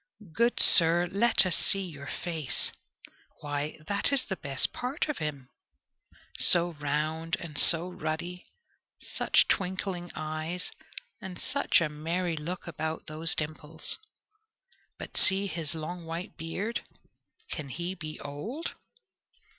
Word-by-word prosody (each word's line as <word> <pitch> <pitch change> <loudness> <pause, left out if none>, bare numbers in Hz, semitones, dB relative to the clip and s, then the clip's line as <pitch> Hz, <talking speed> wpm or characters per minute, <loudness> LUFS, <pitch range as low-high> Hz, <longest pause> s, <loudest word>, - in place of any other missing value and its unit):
Good 235 +4 +1
sir, 170 +1 +7
let 205 0 +3
us 180 -3 +3
see 195 +2 +4
your 145 -6 -9
face 160 -6 -3 0.7
why! 145 0 -4
that 200 +6 +1
is 275 -2 0
the 190 - -4
best 140 -6 -1
part 255 +5 -3
of 300 - -4
him 140 -4 -5 0.9
so 175 -1 +7
round 155 +3 -2
and 160 -3 -9
so 165 +4 +7
ruddy, 175 +1 -5 0.5
such - - +1
twinkling 185 -1 -2
eyes, 155 +3 -4 0.5
and 185 -2 -8
such 270 -8 +1
a 165 - +1
merry 165 +3 -3
look 170 +4 -6
about 160 -1 -5
those 160 +1 +1
dimples! 155 +1 -4 1.0
But - - -7
see 195 +1 +7
his 165 -5 -4
long 170 +2 -6
white 165 +2 -6
beard 190 +8 -4 0.7
can 150 -4 -6
he 175 +7 -4
be 155 -4 -8
old? 215 - -6
165 Hz, 125 wpm, -28 LUFS, 155-185 Hz, 1.0 s, sir